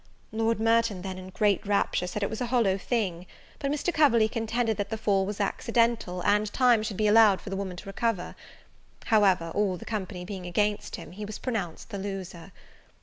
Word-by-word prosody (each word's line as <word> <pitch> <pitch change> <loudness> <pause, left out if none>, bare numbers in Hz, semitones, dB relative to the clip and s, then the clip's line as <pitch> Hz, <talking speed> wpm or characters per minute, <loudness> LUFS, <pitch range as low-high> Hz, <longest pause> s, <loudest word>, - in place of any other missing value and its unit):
Lord 225 0 0
Merton 225 -4 +2
then, 190 -1 -5
in 185 0 -9
great 205 0 +1
rapture, 200 -3 0
said 205 +3 -3
it - - 0
was 220 - -5
a 245 - -1
hollow 230 -6 +2
thing; 190 -4 -2 0.3
but 275 - -2
Mr. 300 +4 -1
Coverley 235 -8 +4
contended, 225 0 -1
that 200 -1 -2
the 220 - -3
fall 195 -3 +1
was 205 0 -5
accidental, 225 -3 0
and 210 +1 +2
time 245 -4 +4
should 210 -3 -4
be 215 - +1
allowed 210 -2 +6
for 200 - -9
the - - -2
woman 190 -2 -4
to 175 - -9
recover. 195 -1 -2 0.7
However, 190 -7 +3
all 200 -3 0
the - - -11
company 190 -4 -4
being 190 -2 -6
against 205 +4 -1
him, - - -10
he 205 +4 -8
was 210 0 -6
pronounced 215 -5 -4
the 200 - -4
loser. 190 -3 -6
205 Hz, 200 wpm, -27 LUFS, 190-225 Hz, 0.7 s, allowed